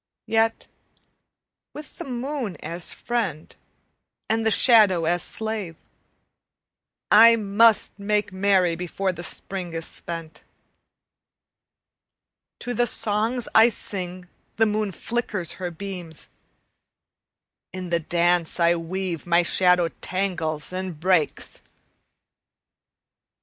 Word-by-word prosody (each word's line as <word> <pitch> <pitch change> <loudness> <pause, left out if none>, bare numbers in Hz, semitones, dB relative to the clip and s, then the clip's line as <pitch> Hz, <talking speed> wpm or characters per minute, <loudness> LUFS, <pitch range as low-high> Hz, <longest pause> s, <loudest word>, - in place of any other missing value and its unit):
Yet 225 0 +1 1.1
with 300 0 -11
the - - -5
moon 250 - -4
as 170 +2 -4
friend 200 -11 -3 0.7
and 225 +1 0
the 225 - +3
shadow 210 -7 +5
as 175 +1 +1
slave 215 -4 -3 1.4
I 230 +2 +8
must 215 0 +3
make 210 0 0
merry 190 -3 +2
before 180 +2 -2
the 175 - -8
Spring 180 -1 -6
is 165 0 -4
spent. 165 -2 -8 2.2
To 245 - -3
the 240 0 +1
songs 220 +3 -1
I 225 +2 +7
sing 185 -4 -6 0.3
the 225 - +3
moon 210 -1 -1
flickers 210 -5 -2
her 180 - -2
beams; 175 -2 -8 1.4
In 185 -1 -7
the 170 - +2
dance 175 +1 0
I 170 0 +4
weave 175 0 -4
my 175 0 +4
shadow 180 -1 +3
tangles 175 -5 -3
and 185 -4 -5
breaks. 180 -3 0
185 Hz, 100 wpm, -24 LUFS, 170-220 Hz, 2.2 s, I